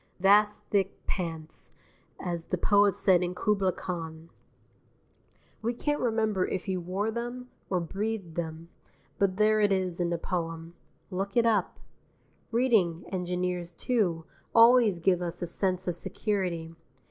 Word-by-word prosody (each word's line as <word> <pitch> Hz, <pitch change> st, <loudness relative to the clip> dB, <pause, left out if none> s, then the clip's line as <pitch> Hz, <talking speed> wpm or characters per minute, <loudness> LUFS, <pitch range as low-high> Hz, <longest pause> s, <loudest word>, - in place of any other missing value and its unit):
Vast 205 Hz, +2 st, +4 dB
thick 195 Hz, -2 st, +1 dB
pants, 165 Hz, -4 st, -5 dB, 0.5 s
as 170 Hz, -2 st, -4 dB
the -, -, -1 dB
poet 205 Hz, -1 st, +4 dB
said 190 Hz, -3 st, +4 dB
in 180 Hz, 0 st, -2 dB
"Khubla 195 Hz, 0 st, +1 dB
Khan." 165 Hz, -2 st, -6 dB, 1.3 s
We 235 Hz, +2 st, -1 dB
can't 295 Hz, +4 st, -1 dB
remember 220 Hz, -5 st, +1 dB
if 185 Hz, -, -3 dB
he 190 Hz, -2 st, -1 dB
wore 185 Hz, +5 st, -2 dB
them, 240 Hz, +2 st, -5 dB, 0.2 s
or 185 Hz, -, +1 dB
breathed 195 Hz, +1 st, -3 dB
them, 165 Hz, 0 st, -5 dB, 0.5 s
but 190 Hz, -2 st, +1 dB
there 215 Hz, 0 st, +4 dB
it 205 Hz, -1 st, +3 dB
is 185 Hz, -2 st, 0 dB
in 175 Hz, -, +1 dB
the 170 Hz, -, 0 dB
poem; 165 Hz, -1 st, -4 dB, 0.4 s
look 195 Hz, +3 st, -3 dB
it 235 Hz, -, +5 dB
up. 215 Hz, -5 st, +1 dB, 0.7 s
Reading 220 Hz, -9 st, +2 dB
engineers, 180 Hz, -1 st, -2 dB
too, 180 Hz, -10 st, 0 dB, 0.3 s
always 230 Hz, -4 st, +7 dB
give 180 Hz, +1 st, +2 dB
us 175 Hz, 0 st, -4 dB
a -, -, 0 dB
sense 185 Hz, +1 st, -1 dB
of 180 Hz, -, +1 dB
security. 180 Hz, -3 st, -2 dB
185 Hz, 140 wpm, -28 LUFS, 175-210 Hz, 1.3 s, always